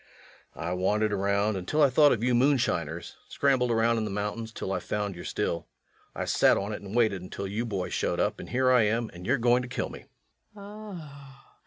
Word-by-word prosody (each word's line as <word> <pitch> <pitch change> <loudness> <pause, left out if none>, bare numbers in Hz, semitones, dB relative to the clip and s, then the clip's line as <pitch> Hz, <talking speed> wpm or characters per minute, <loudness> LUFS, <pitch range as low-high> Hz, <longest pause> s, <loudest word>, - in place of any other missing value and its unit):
I 85 +1 -3
wandered 105 +4 +1
around 100 +1 +1
until 95 +12 +1
I 140 - +5
thought 145 +2 +6
of 115 - 0
you 125 0 +2
moonshiners... 130 +2 +1
scrambled 130 -3 +2
around 115 0 +2
in - - -1
the 105 - -3
mountains 105 +3 -3
until 105 -3 -5
I - - -1
found 105 -1 -3
your 85 - -9
still. 85 -1 -2 0.5
I - - -2
sat - - +4
on 100 +2 -3
it - - -6
and 100 +2 -8
waited 110 -6 +2
until 95 +2 -6
you 110 +5 -3
boys 95 -4 -3
showed - - -1
up, - - 0
and - - -8
here 130 +1 +2
I 125 -2 +6
am, 110 +2 0
and 90 +1 -9
you're - - +3
going 120 +1 +3
to 125 - -6
kill 125 - -3
me. - - -11 0.5
LUKE. 205 -3 -9
110 Hz, 210 wpm, -28 LUFS, 100-125 Hz, 0.5 s, thought